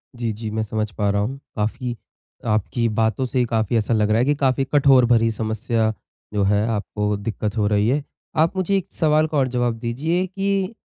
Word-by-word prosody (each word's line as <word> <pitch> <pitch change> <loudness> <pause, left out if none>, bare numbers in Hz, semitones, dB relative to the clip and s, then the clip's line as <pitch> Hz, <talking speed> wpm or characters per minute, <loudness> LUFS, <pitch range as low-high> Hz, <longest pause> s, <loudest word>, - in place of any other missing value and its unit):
जी, 120 -2 -2
जी। 110 +1 -6
मैं 110 +1 -1
समझ 110 0 -2
पा 100 +3 -1
रहा 100 0 +1
हूँ 130 +6 -3 0.2
काफ़ी 120 +3 -2 0.5
आपकी 110 +2 0
बातों 110 +4 +1
से 125 0 0
काफ़ी 115 -1 0
ऐसा 110 +1 0
लग 105 -1 +2
रहा 110 +1 +3
है 125 - +3
कि 145 +2 +2
काफ़ी 135 -1 +1
कठोर 135 -3 +6
भरी 115 -1 +3
समस्या 110 0 -1 0.4
जो 105 -1 +1
है 105 +2 +2
आपको 105 -1 -1
दिक्कत 105 +1 -3
हो 105 -1 +2
रही 105 0 +2
है। 140 +3 +1 0.3
आप 160 +4 +3
मुझे 190 +1 +1
एक 190 - -5
सवाल 155 0 +2
का 155 -1 -2
और 135 -2 +3
जवाब 120 -2 -1
दीजिए 150 +10 -1
कि 195 +1 -1
115 Hz, 205 wpm, -22 LUFS, 110-135 Hz, 0.5 s, कठोर